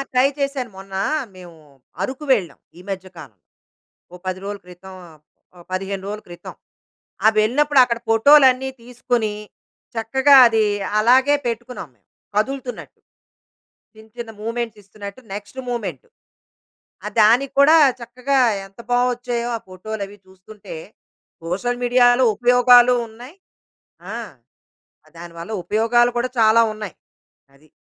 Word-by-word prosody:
Try 255 Hz, +2 st, +4 dB
చేశాను. 275 Hz, -4 st, -2 dB
మొన్న 195 Hz, 0 st, -11 dB, 0.4 s
మేము 175 Hz, -2 st, -13 dB, 0.5 s
అరకు 265 Hz, +3 st, -4 dB
వెళ్ళాం, 185 Hz, -, -1 dB, 0.2 s
ఈ -, -, -13 dB
మధ్య 190 Hz, -1 st, -5 dB
కాలం. 130 Hz, -10 st, -12 dB, 0.8 s
ఓ -, -, -9 dB
10 185 Hz, 0 st, -3 dB
రోజుల 200 Hz, 0 st, -5 dB
క్రితం 185 Hz, +1 st, -13 dB, 0.6 s
ఆహ్, 175 Hz, -, -16 dB
15 195 Hz, +1 st, -4 dB
రోజుల 210 Hz, +1 st, -5 dB
క్రితం. 175 Hz, 0 st, -10 dB, 0.7 s
ఆ -, -, +7 dB
వెళ్ళినప్పుడు 270 Hz, +6 st, +3 dB
అక్కడ 235 Hz, -1 st, -3 dB
ఫోటో‌లన్ని 265 Hz, +2 st, +5 dB
తీసుకొని, 240 Hz, -2 st, -2 dB, 0.6 s
చక్కగా 265 Hz, +5 st, +4 dB
అది 225 Hz, -2 st, +2 dB, 0.4 s
అలాగే 260 Hz, +6 st, +4 dB
పెట్టుకున్నాం, 240 Hz, -5 st, -5 dB
మేము 100 Hz, -, -43 dB, 0.3 s
కదులుతున్నట్టు. 255 Hz, +3 st, -3 dB, 1.1 s
చిన్న, 220 Hz, 0 st, -17 dB
చిన్న 230 Hz, -2 st, -6 dB
మూమెంట్స్ 230 Hz, -1 st, -4 dB
ఇస్తున్నట్టు 200 Hz, +3 st, -10 dB
నెక్స్ట్ 205 Hz, +5 st, -9 dB
మూమెంట్. 200 Hz, -, -5 dB, 1.0 s
ఆ -, -, -1 dB
దానికి 245 Hz, +6 st, +3 dB
కూడా 310 Hz, +3 st, +7 dB, 0.2 s
చక్కగా 250 Hz, +3 st, -2 dB, 0.3 s
ఎంత 195 Hz, +4 st, -17 dB
బావొచ్చాయో 245 Hz, -1 st, 0 dB
ఆ -, -, -5 dB
ఫోటోలు 200 Hz, +3 st, -7 dB
అవి 205 Hz, +1 st, -14 dB
చూస్తుంటే, 200 Hz, -, -12 dB, 0.7 s
సోషల్ 245 Hz, +8 st, -3 dB
మీడియాలో 245 Hz, +1 st, +4 dB
ఉపయోగాలు 245 Hz, +1 st, +5 dB
ఉన్నాయి 245 Hz, -, -13 dB, 0.8 s
ఆ! -, -, -5 dB, 1.0 s
దానివల్ల 170 Hz, +4 st, -9 dB
ఉపయోగాలు 240 Hz, +3 st, +2 dB
కూడా 245 Hz, +1 st, 0 dB
చాలా 225 Hz, 0 st, +5 dB
ఉన్నాయి 215 Hz, -3 st, -8 dB, 0.6 s
అది. 155 Hz, +3 st, -24 dB
230 Hz, 120 wpm, -20 LUFS, 200-250 Hz, 1.1 s, ఆ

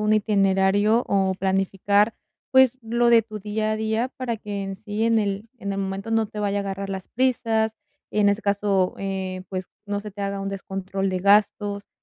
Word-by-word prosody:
un 210 Hz, 0 st, +2 dB
itinerario 205 Hz, +1 st, +3 dB
o 190 Hz, -1 st, +2 dB
planificar, 195 Hz, +3 st, +1 dB, 0.4 s
pues 260 Hz, -1 st, +5 dB
lo 235 Hz, +1 st, +2 dB
de 230 Hz, -1 st, +6 dB
tu 215 Hz, -1 st, -8 dB
día 215 Hz, +1 st, -1 dB
a -, -, -1 dB
día, 220 Hz, +3 st, 0 dB
para 245 Hz, -3 st, -2 dB
que 205 Hz, -2 st, -5 dB
en 195 Hz, 0 st, -5 dB
sí 210 Hz, +2 st, -4 dB
en 230 Hz, -1 st, +3 dB
el 205 Hz, +1 st, -2 dB
en 200 Hz, -2 st, -3 dB
el 195 Hz, -, -3 dB
momento 195 Hz, +2 st, -3 dB
no 225 Hz, -1 st, +2 dB
te 210 Hz, 0 st, -9 dB
vaya 205 Hz, -1 st, 0 dB
a -, -, 0 dB
agarrar 195 Hz, 0 st, -4 dB
las 190 Hz, -1 st, -5 dB
prisas, 225 Hz, -3 st, +1 dB, 0.4 s
y 210 Hz, -, 0 dB
en 205 Hz, -, +5 dB
ese 200 Hz, +2 st, +1 dB
caso, 200 Hz, -2 st, +1 dB
eh, 190 Hz, -1 st, -3 dB
pues 185 Hz, -1 st, -4 dB, 0.2 s
no 205 Hz, 0 st, -2 dB
se 210 Hz, 0 st, -8 dB
te 200 Hz, +1 st, -7 dB
haga 200 Hz, 0 st, -2 dB
un 195 Hz, -, -3 dB
descontrol 195 Hz, 0 st, -3 dB
de 185 Hz, -, -1 dB
gastos, 205 Hz, +1 st, +2 dB
205 Hz, 205 wpm, -24 LUFS, 195-220 Hz, 0.4 s, de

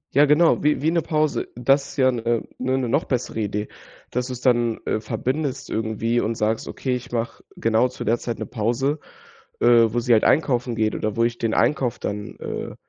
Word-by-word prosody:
Ja, 145 Hz, +2 st, +7 dB
genau, 150 Hz, +3 st, +4 dB
wie 150 Hz, 0 st, +2 dB
wie 160 Hz, -, +3 dB
'ne 170 Hz, -, +2 dB
Pause. 155 Hz, -1 st, 0 dB
Das 135 Hz, +3 st, +2 dB
ist -, -, -12 dB
ja 130 Hz, -1 st, +4 dB
'ne 115 Hz, -1 st, -1 dB, 0.2 s
ne, 130 Hz, +1 st, 0 dB
'ne 130 Hz, -2 st, -1 dB
noch 140 Hz, +7 st, +1 dB
bessere 125 Hz, -3 st, -2 dB
Idee. 105 Hz, 0 st, -2 dB, 0.4 s
Dass 125 Hz, 0 st, -1 dB
du's 125 Hz, -1 st, -6 dB
dann, 120 Hz, -3 st, +2 dB
äh, 110 Hz, -, 0 dB
verbindest 135 Hz, +4 st, -3 dB
irgendwie 115 Hz, +2 st, 0 dB
und 115 Hz, 0 st, -1 dB
sagst: 110 Hz, +1 st, -1 dB
„Okay, 130 Hz, -2 st, -2 dB
ich 125 Hz, -, -7 dB
mache 115 Hz, -1 st, -3 dB
genau 115 Hz, +2 st, +2 dB
zu 125 Hz, -, -7 dB
der 115 Hz, +2 st, +1 dB
Zeit 120 Hz, -2 st, -4 dB
'ne -, -, -4 dB
Pause, 120 Hz, +6 st, -1 dB, 0.6 s
äh, -, -, +1 dB, 0.3 s
wo 120 Hz, -, +1 dB
sie 120 Hz, 0 st, +3 dB
halt 110 Hz, -, +4 dB
einkaufen 125 Hz, -5 st, +2 dB
geht 110 Hz, -1 st, +1 dB
oder 110 Hz, -1 st, -2 dB
wo 115 Hz, -, +2 dB
ich 120 Hz, 0 st, -1 dB
den 115 Hz, -1 st, 0 dB
Einkauf 130 Hz, -5 st, +1 dB
dann, 105 Hz, 0 st, -5 dB
äh, -, -, -5 dB
120 Hz, 210 wpm, -23 LUFS, 115-135 Hz, 0.6 s, Ja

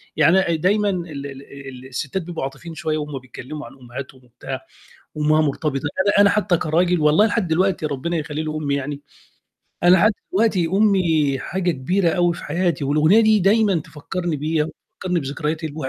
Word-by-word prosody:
يعني 185 Hz, +3 st, +5 dB
أ 170 Hz, -3 st, +1 dB
ديمًا 200 Hz, +5 st, +2 dB
ال 170 Hz, -7 st, -4 dB
ال 135 Hz, -1 st, -10 dB
الستّات 140 Hz, +7 st, -3 dB
بيبقوا 170 Hz, -3 st, -5 dB
عاطفيين 160 Hz, +5 st, -7 dB
شوية 155 Hz, 0 st, -2 dB
وهم 150 Hz, -2 st, -4 dB
بيتكلموا 130 Hz, +3 st, -9 dB
عن -, -, -12 dB
أمهاتهم 130 Hz, +1 st, -9 dB
وبتاع، 130 Hz, +2 st, -8 dB, 0.5 s
وأمها 155 Hz, +1 st, +3 dB
مرتبطة 150 Hz, 0 st, -1 dB
أنا 190 Hz, +9 st, 0 dB
أنا 200 Hz, -, +6 dB
حتى 205 Hz, -4 st, +2 dB
كراجل 175 Hz, +3 st, +1 dB
والله 150 Hz, +7 st, +5 dB
لحد 215 Hz, -3 st, 0 dB
دلوقتي 180 Hz, 0 st, +1 dB
ربنا 150 Hz, +4 st, -2 dB
يخلّي 150 Hz, 0 st, -3 dB
لي 155 Hz, -, -3 dB
أمي 150 Hz, -2 st, -1 dB
يعني، 140 Hz, +1 st, -4 dB, 0.8 s
أنا 180 Hz, +2 st, +6 dB
حتى 215 Hz, 0 st, +4 dB, 0.2 s
دلوقتي 195 Hz, -4 st, +2 dB
أمي 170 Hz, -8 st, +2 dB
حاجة 180 Hz, +5 st, -1 dB
كبيرة 170 Hz, +6 st, 0 dB
أوي 175 Hz, 0 st, +2 dB
في -, -, -9 dB
حياتي 170 Hz, -1 st, -1 dB
والأغنية 155 Hz, +9 st, +4 dB
دي 215 Hz, -1 st, +4 dB
ديمًا 200 Hz, +1 st, +3 dB
تفكرني 165 Hz, +1 st, -4 dB
بيها 155 Hz, +1 st, 0 dB
وتفكرني 180 Hz, +2 st, -5 dB
بذكريات 150 Hz, +3 st, -3 dB
الواح 150 Hz, -3 st, -4 dB
160 Hz, 170 wpm, -21 LUFS, 145-185 Hz, 0.8 s, أنا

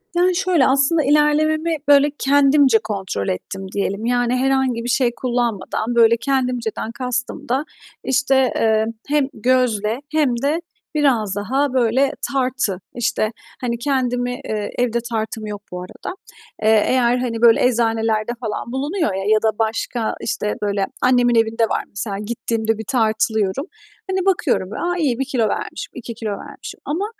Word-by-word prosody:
Yani, 360 Hz, +1 st, +3 dB
şöyle 355 Hz, -7 st, +3 dB
aslında, 275 Hz, +4 st, +3 dB
ilerlememi 310 Hz, +3 st, +2 dB
böyle 285 Hz, 0 st, +6 dB
kendimce 275 Hz, -3 st, +4 dB
kontrol 195 Hz, -, -3 dB
ettim 190 Hz, -, -4 dB
diyelim. 200 Hz, +2 st, -2 dB
Yani, 245 Hz, 0 st, +1 dB
herhangi 265 Hz, -2 st, +1 dB
bir 245 Hz, -, -3 dB
şey 245 Hz, -1 st, +2 dB
kullanmadan 240 Hz, -2 st, -1 dB
böyle; 230 Hz, 0 st, +5 dB
kendimceden 250 Hz, -3 st, -1 dB
kastım 250 Hz, 0 st, -4 dB
da 270 Hz, +5 st, +1 dB, 0.4 s
işte, 265 Hz, +1 st, +2 dB, 0.2 s
eee, 220 Hz, -1 st, +2 dB, 0.2 s
hem 290 Hz, -2 st, +2 dB
gözle 235 Hz, -2 st, +1 dB
hem 305 Hz, -4 st, +2 dB
de 310 Hz, +4 st, +1 dB, 0.3 s
biraz 235 Hz, -9 st, +2 dB
daha 265 Hz, +6 st, 0 dB
böyle 255 Hz, +2 st, +2 dB, 0.2 s
tartı. 255 Hz, -8 st, 0 dB, 0.2 s
İşte, 235 Hz, -2 st, 0 dB, 0.3 s
hani, 235 Hz, -2 st, -1 dB
kendimi, 245 Hz, -1 st, 0 dB
eee, 210 Hz, -1 st, -3 dB
evde 235 Hz, -1 st, +1 dB
tartım 220 Hz, -1 st, -3 dB
yok 205 Hz, -1 st, -6 dB
bu 180 Hz, 0 st, -5 dB
arada. 180 Hz, -, -7 dB, 0.5 s
Eee, 215 Hz, -1 st, +5 dB
eğer, 245 Hz, -1 st, +3 dB
hani, 235 Hz, -2 st, -3 dB
böyle 235 Hz, 0 st, +6 dB
eczanelerde 225 Hz, -2 st, +1 dB
falan 220 Hz, +1 st, -4 dB
bulunuyor 280 Hz, -, -1 dB
ya 190 Hz, 0 st, -3 dB
ya 215 Hz, -, +3 dB
da 220 Hz, -, +4 dB
başka 225 Hz, +1 st, -1 dB
işte, 210 Hz, -, -2 dB
böyle 200 Hz, -1 st, 0 dB, 0.2 s
annemin 245 Hz, -1 st, +4 dB
evinde 225 Hz, 0 st, +2 dB
var -, -, -1 dB
mesela, 200 Hz, 0 st, -4 dB
gittiğimde 225 Hz, 0 st, -2 dB
bir 220 Hz, -, -6 dB
tartılıyorum. 220 Hz, 0 st, +1 dB, 0.5 s
Hani, 380 Hz, 0 st, 0 dB
bakıyorum; 290 Hz, -, +1 dB
a, 355 Hz, +1 st, -1 dB
1 270 Hz, -5 st, 0 dB
kilo 245 Hz, -5 st, 0 dB
vermişim, -, -, -4 dB
2 235 Hz, -2 st, -6 dB
kilo 220 Hz, -2 st, -4 dB
vermişim 200 Hz, -, -8 dB
ama 330 Hz, +7 st, -1 dB
240 Hz, 150 wpm, -20 LUFS, 220-270 Hz, 0.5 s, böyle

